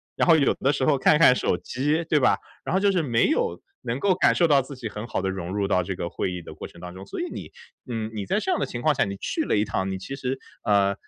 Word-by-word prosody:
然 - - +1
后 165 - +7
有 145 -4 +3
的 135 +2 +1
时 135 - -1
候 140 +1 +3
看 150 +3 +4
看 150 - +7
手 - - 0
机， 145 +6 -1
对 160 -2 +2
吧？ 130 - +3 0.3
然 - - -2
后 190 - +3
就 200 0 +4
是 185 -3 +1
没 120 -6 +2
有 470 +9 0 0.3
能 120 - -2
够 200 -2 +4
感 - - +3
受 175 - +4
到 140 -2 +5
自 135 +2 -9
己 120 -4 -6
很 105 +2 -7
好 - - -2
的 95 - -1
融 95 -1 -4
入 100 -1 0
到 90 -1 +2
这 95 +2 -4
个 85 - -4
会 - - -2
议 90 - -5
的 - - -10
过 - - -8
程 85 - -16
当 90 0 -8
中， 95 +1 -10
所 - - -5
以 355 - -3
你， - - -7 0.4
嗯， 110 -2 -3
你 105 -2 -4
在 195 - 0
这 380 - -1
样 360 - +1
的 - - 0
情 120 - -6
况 155 +3 +3
下 135 -5 +1
你 100 0 -4
去 320 - -2
了 - - 0
一 105 - +3
趟， 95 -2 -2
你 95 - -3
其 135 +9 -7
实， 130 0 -2 0.3
呃， 100 -2 +3
125 Hz, 330 characters per minute, -25 LUFS, 100-155 Hz, 0.4 s, 后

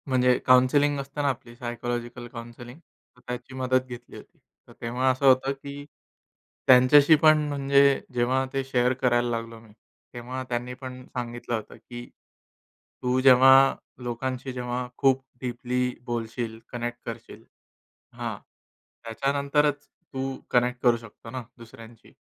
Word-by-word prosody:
म्हणजे 125 -1 +3
काउन्सेलिंग 135 +3 +4
असतं 140 +2 -5
ना, 140 - +2
आपली 120 -2 -6
सायकॉलॉजिकल 120 0 -5
काउन्सेलिंग, 120 +2 -10
तर 125 -6 -31
त्याची 125 +1 -6
मदत 130 0 +1
घेतली 120 -1 -10
होती. - - -15 0.3
तर - - -15
तेव्हा 125 +3 0
असं 130 +2 -2
होतं, 135 +1 +5
की 140 +1 -9 0.8
त्यांच्याशी 140 +5 +7
पण 155 -1 +7
म्हणजे 140 -1 +3
जेव्हा 125 +2 +1
ते 135 0 -1
शेअर 125 -1 +1
करायला 120 -1 +2
लागलो 115 -1 -4
मी, 110 0 -19 0.4
तेव्हा 125 +2 -6
त्यांनीपण 125 +1 -5
सांगितलं 120 -1 -5
होतं, 110 -2 -7
की 120 0 -10 1.0
तू 125 +1 +1
जेव्हा 135 +1 +7 0.3
लोकांशी 130 +2 -4
जेव्हा 125 0 -3
खूप 135 -1 +3 0.2
डीपली 125 0 -2
बोलशील, 115 -1 -4
कनेक्ट 120 0 -4
करशील - - -9 0.7
हां, - - -5 0.7
त्याच्यानंतरच 140 +4 0 0.4
तू 135 0 -3 0.2
कनेक्ट 125 0 +1
करू 120 -2 +4
शकतो 115 0 -13
ना 130 +2 -5 0.2
दुसऱ्यांशी. 115 -1 -14
125 Hz, 130 wpm, -26 LUFS, 120-135 Hz, 1.0 s, त्यांच्याशी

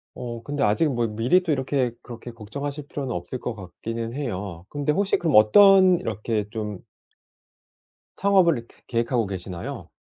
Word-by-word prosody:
어 120 -2 -6
근데 145 +1 -2
아직 120 +9 +2
뭐 120 -1 0
미리 120 +12 +2
또 160 -4 +1
이렇게 130 -2 0
그렇게 120 0 -9
걱정하실 140 +6 -6
필요는 135 -4 -4
없을 90 +9 -5
것 120 - -4
같기는 115 +5 -6
해요. 100 - -5
근데 145 0 -1
혹시 195 +5 +1
그럼 160 -9 +3
어떤 185 - +7
이렇게 105 - -2
좀 105 -4 -5 1.4
창업을 190 -6 +4
이렇게 115 - -13
계획하고 115 -1 0
계시나요? 90 -2 -6
120 Hz, 335 characters per minute, -24 LUFS, 105-145 Hz, 1.4 s, 어떤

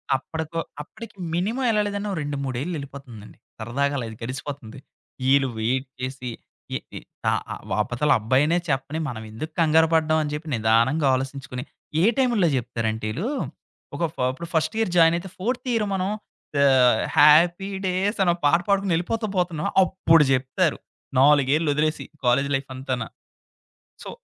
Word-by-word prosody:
అప్పటికో 160 +4 -4 0.2
అప్పటికి 220 +10 -11 0.2
మినిమం 215 +10 -1
ఎళాలేదంటా 205 -1 -1
2, 145 0 -3
మూడేళ్ళెళ్ళిపోతుందండి. 135 - -6 0.2
సరదాగా 140 +6 -1
అలా 125 - -3
అది 110 - -10
గడిసిపోతుంది. 135 -1 -6 0.5
ఈళు 140 -1 +4
వెయిట్ 130 +4 0
చేసి, 130 -1 -4 0.5
ఎ - - -1 0.2
ఎ - - -5 0.3
ఆహ్, - - -1
ఆహ్, - - -9 0.2
ఆతల 120 +7 0
అబ్బాయినే 135 +9 +2
చెప్పని, 140 +3 -1
మనం 110 -3 -6
ఎందుకు 155 +9 -6
కంగరపడ్డం 160 0 +3
అని 150 - -4
చెప్పి 150 +2 -5
నిదానంగా 115 +7 +2
ఆలోచించుకొని 135 -1 -5 0.4
ఏ - - +3
టైముల్లో 240 -9 +3
చెప్తారంంట 115 -3 -3
ఈళ్ళు, 175 - -3 0.7
ఒక - - -2
ఫ - - -39 0.2
ఇప్పుడు 170 +5 -8
ఫస్ట్ 160 +6 +1
ఇయర్ 225 -5 0
జాయినయితే, 170 +3 +4
ఫోర్త్ 245 +7 -3
ఇయర్ 220 -2 +1
మనం 190 0 -1 0.6
ఆహ్, 125 -4 +5 0.2
'హ్యాపీ 170 +6 +6 0.2
డేస్' 190 +4 0
అనొక 175 0 +1
పాట 165 +4 +5
పాడుకొని 200 -2 +2
ఎళ్ళిపోతూ 215 +6 -2
పోతున్నాం 170 -4 0 0.2
అప్పుడు 165 -4 +4
చెప్తారు. 135 +6 0 0.4
నాలుగేళ్ళొదిలేసి. 150 +2 +3 0.2
కాలేజీ 140 +3 +3
లైఫంతానా. 130 -3 -4 1.0
సో, - - -7
150 Hz, 135 wpm, -24 LUFS, 130-175 Hz, 1.0 s, హ్యాపీ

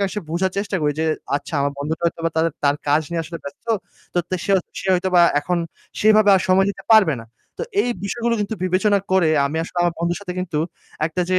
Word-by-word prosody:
আসে 210 - -3
বোঝার 185 +2 0
চেষ্টা 200 -1 -1
করি 150 0 +2
যে 160 - +1 0.3
আচ্ছা 145 - -7
আমার 140 0 0
বন্ধুটা 155 +3 -3
হয়তো 170 0 0
বা 165 - 0
তার 160 +1 +3 0.2
তার 140 0 +3
কাজ 145 +2 +4
নিয়ে 170 -1 -1
আসলে 165 +1 -7
ব্যস্ত। 140 +10 -10 0.5
তো - - +2
তো - - 0
সে 200 - +1 0.3
সে - - -7
হয়তো 180 +1 0
বা 175 - +7 0.2
এখন 180 +3 -1 0.4
সেইভাবে 215 -1 +5
আর - - +1
সময় 190 +1 +4
দিতে 195 - -9
পারবে 200 -9 +6
না। - - -16 0.3
তো - - -2 0.2
এই 245 - -1
বিষয়গুলো 235 +3 -1
কিন্তু 205 +2 -2
বিবেচনা 195 +3 +2
করে 180 -4 +4 0.2
আমি 150 +3 -4
আসলে 175 - -6
আমার 175 -1 +1
বন্ধুর 170 +1 -1
সাথে 185 -3 -5
কিন্তু 170 -4 -2 0.5
একটা 175 +3 -2
যে 185 - +4
180 Hz, 225 wpm, -21 LUFS, 160-200 Hz, 0.5 s, বা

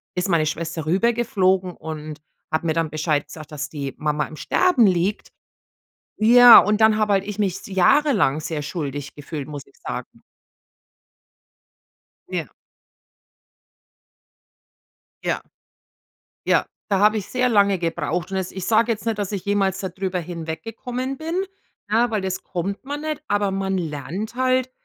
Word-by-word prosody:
ist 180 +2 0
meine 165 -4 +2
Schwester 160 0 -3
rüber 195 +9 +2
geflogen 190 -5 +1
und 155 -1 -7 0.3
hat 160 +1 0
mir 160 - +1
dann 165 -1 0
Bescheid 150 -1 0
gesagt, 155 +1 -11
dass 150 +1 -4
die 140 -3 -5
Mama 150 0 0
im - - -11
Sterben 290 - +3
liegt. 185 +2 +1 0.9
Ja, 240 +2 +9
und 210 +1 +3
dann 220 -1 +5
habe 210 -1 +2
halt 195 -1 +2
ich 210 0 -6
mich 195 -4 +1
s - - -12
jahrelang 195 - +3
sehr 150 -1 -4
schuldig 145 -2 -5
gefühlt, 145 -1 -6
muss 145 -2 -7
ich - - -25
sagen. - - -7 2.1
Ja. - - -4 2.7
Ja. - - -1 1.1
Ja, - - +3 0.2
da 195 - +2
habe 210 +2 +4
ich 205 - -4
sehr 255 0 +1
lange 200 -3 +4
gebraucht 170 +1 -2
und 190 - -1
jetzt 185 -1 -3
ich 190 -1 -5
sage 230 +1 +3
jetzt 220 0 -4
nicht, 225 -2 -1
dass 205 0 -2
ich 195 -3 -4
jemals 195 -2 +1
da 190 - -3
drüber 185 0 -3
hinweggekommen 225 +10 -5
bin, 320 +3 -4 0.5
ne, 230 +3 +3
weil 215 -3 -1
das 190 0 -3
kommt 195 +5 -4
man 290 +2 -5
nicht, 310 -2 -3
aber 205 -1 +1
man 190 0 -1
lernt 175 - -4
halt, 255 0 +1
190 Hz, 155 wpm, -22 LUFS, 160-220 Hz, 2.7 s, Ja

